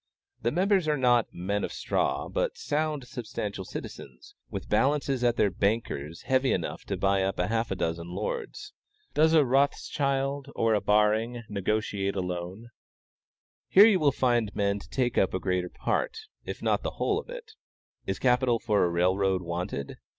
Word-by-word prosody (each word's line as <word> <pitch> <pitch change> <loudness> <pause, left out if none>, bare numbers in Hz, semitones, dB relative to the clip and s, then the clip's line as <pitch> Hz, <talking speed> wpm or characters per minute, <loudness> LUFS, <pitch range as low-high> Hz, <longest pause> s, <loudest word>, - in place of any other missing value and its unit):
The 115 - +1
members 185 - +2
are 150 -1 +2
not 120 -3 +3
"men 100 +3 -2
of - - -3
straw," - - -1
but - - -2
sound, 150 -2 -1
substantial 105 -5 -5
citizens, 65 -8 -9 0.2
with - - -6
balances 140 -2 +1
at 120 -1 +3
their 105 -3 +2
bankers 100 -6 -2
heavy 130 0 +2
enough - - -3
to - - -3
buy 95 0 +2
up 95 0 -1
half 115 +5 0
a 95 - -1
dozen 85 -1 -3
lords. 95 +4 -5 0.4
Does 160 +1 +4
a 155 -3 +6
Rothschild 140 +1 0
or 115 -1 +2
a 105 - +2
Baring 110 +4 +2
negotiate 100 -1 -1
a 95 - 0
loan? 90 +5 -5 1.0
Here 200 +2 +8
you 210 -5 +4
will 150 -3 +4
find 120 -5 +1
men 100 0 0
to - - -14
take 125 -3 0
up 95 - +3
the 95 - 0
greater 90 -2 -1
part, 485 - -2 0.3
if - - -6
not - - +2
the - - -4
whole 415 0 +1
of 475 - -11
it. - - -9 0.6
Is - - -1
capital 125 -1 +3
for 105 -2 +1
a 90 - +2
railroad 95 +2 +1
wanted? 85 -4 -4
110 Hz, 170 wpm, -28 LUFS, 95-135 Hz, 1.0 s, Here